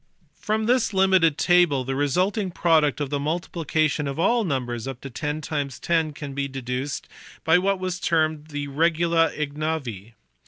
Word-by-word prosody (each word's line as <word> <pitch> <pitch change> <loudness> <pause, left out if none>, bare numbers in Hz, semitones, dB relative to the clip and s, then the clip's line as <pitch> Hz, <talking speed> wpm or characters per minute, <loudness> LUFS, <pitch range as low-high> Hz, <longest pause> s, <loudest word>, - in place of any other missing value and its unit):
From 215 +1 -1
this 240 -3 +2
limited 190 -5 +4
table 175 -7 +3
the 135 +1 -3
resulting 180 - 0
product 160 -5 +2
of 145 -2 -3
the 145 - 0
multiplication 155 -1 -1
of 140 - -4
all 230 +7 +2
numbers 125 - -3
up 135 -2 -6
to 135 - -8
10 150 +3 -3
x 140 -4 -3
10 160 -3 0
can 145 -1 -7
be 140 0 -2
deduced 130 +1 -4 0.4
by 160 +2 +5
what 195 +1 +1
was 185 -1 -3
termed 155 -3 0
the 145 -2 -4
regula 165 +3 +2
ignavi. 145 -8 -4
155 Hz, 160 wpm, -24 LUFS, 140-175 Hz, 0.4 s, by